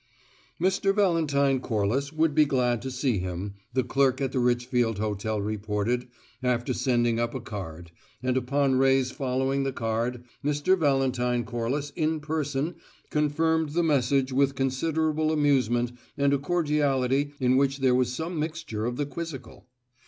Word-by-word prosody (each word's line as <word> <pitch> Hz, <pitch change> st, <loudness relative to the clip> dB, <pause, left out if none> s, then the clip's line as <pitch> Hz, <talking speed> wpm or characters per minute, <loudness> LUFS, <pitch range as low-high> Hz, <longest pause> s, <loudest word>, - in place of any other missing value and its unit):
Mr. 195 Hz, +2 st, +2 dB
Valentine 150 Hz, -9 st, +2 dB
Corliss 120 Hz, +5 st, -1 dB
would 160 Hz, -1 st, +1 dB
be 155 Hz, +1 st, +5 dB
glad 125 Hz, -5 st, +1 dB
to 130 Hz, -, -4 dB
see 125 Hz, -4 st, 0 dB
him, 90 Hz, +2 st, -4 dB, 0.2 s
the 130 Hz, -, +2 dB
clerk 135 Hz, -1 st, +2 dB
at 135 Hz, -2 st, -1 dB
the 130 Hz, -, -1 dB
Richfield 120 Hz, -2 st, +1 dB
Hotel 105 Hz, 0 st, -2 dB
reported, 105 Hz, +4 st, -2 dB, 0.3 s
after 125 Hz, 0 st, 0 dB
sending 120 Hz, -3 st, +1 dB
up 120 Hz, +1 st, -1 dB
a -, -, -2 dB
card, 85 Hz, -7 st, -7 dB, 0.3 s
and 130 Hz, 0 st, +1 dB
upon 130 Hz, +1 st, +1 dB
Ray's 135 Hz, -1 st, +3 dB
following 135 Hz, 0 st, -1 dB
the 135 Hz, 0 st, -1 dB
card, 120 Hz, +1 st, -2 dB, 0.2 s
Mr. 145 Hz, +6 st, +2 dB
Valentine 130 Hz, -6 st, +1 dB
Corliss 120 Hz, +6 st, -3 dB
in 155 Hz, +1 st, -1 dB
person 150 Hz, 0 st, -2 dB, 0.3 s
confirmed 155 Hz, +1 st, +1 dB
the 170 Hz, +1 st, +2 dB
message 135 Hz, -3 st, +2 dB
with 135 Hz, +1 st, +2 dB
considerable 155 Hz, +4 st, 0 dB
amusement 130 Hz, -6 st, +2 dB, 0.3 s
and 140 Hz, 0 st, +3 dB
a 140 Hz, -, +2 dB
cordiality 145 Hz, -3 st, +1 dB
in 130 Hz, -1 st, +3 dB
which 135 Hz, 0 st, +2 dB
there 130 Hz, -2 st, +3 dB
was 125 Hz, -1 st, +2 dB
some 160 Hz, +5 st, -4 dB
mixture 155 Hz, -9 st, -3 dB
of 120 Hz, -, -2 dB
the 145 Hz, -, 0 dB
quizzical. 155 Hz, -3 st, -8 dB
135 Hz, 150 wpm, -27 LUFS, 120-145 Hz, 0.3 s, be